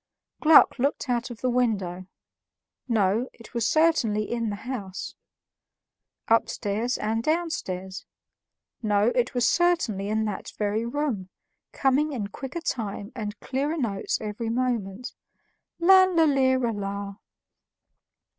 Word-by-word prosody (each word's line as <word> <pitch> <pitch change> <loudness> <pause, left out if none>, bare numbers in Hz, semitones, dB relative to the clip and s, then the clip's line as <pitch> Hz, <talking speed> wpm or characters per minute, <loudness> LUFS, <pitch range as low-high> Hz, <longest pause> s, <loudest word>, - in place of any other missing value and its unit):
Gluck 310 -3 +6
looked 275 +1 -1
out 240 +1 0
of 235 -3 -9
the 255 - +1
window; 195 -7 -1 0.8
no, 220 +1 +1
it 230 - -15
was 235 -2 0
certainly 260 -10 +2
in 230 -2 -1
the 205 - -3
house. 205 -8 -5 1.1
Upstairs 225 +1 +1
and 220 +2 -1
downstairs; 195 - -2 0.7
no, 210 0 +2
it 250 +1 0
was 245 -1 +3
certainly 330 - +1
in 220 +1 0
that 210 -2 -5
very 215 +2 -1
room, 235 -8 -2 0.4
coming 285 +3 +1
in 210 -6 -3
quicker 270 +9 -6
time 215 -8 -4
and 210 -3 -5
clearer 285 +5 -2
notes 210 -9 -1
every 220 +2 -4
moment: 235 -1 -2 0.7
"Lala 370 -1 +6
lira 260 -4 +2
la." 200 -1 -5
235 Hz, 115 wpm, -26 LUFS, 205-270 Hz, 1.1 s, Gluck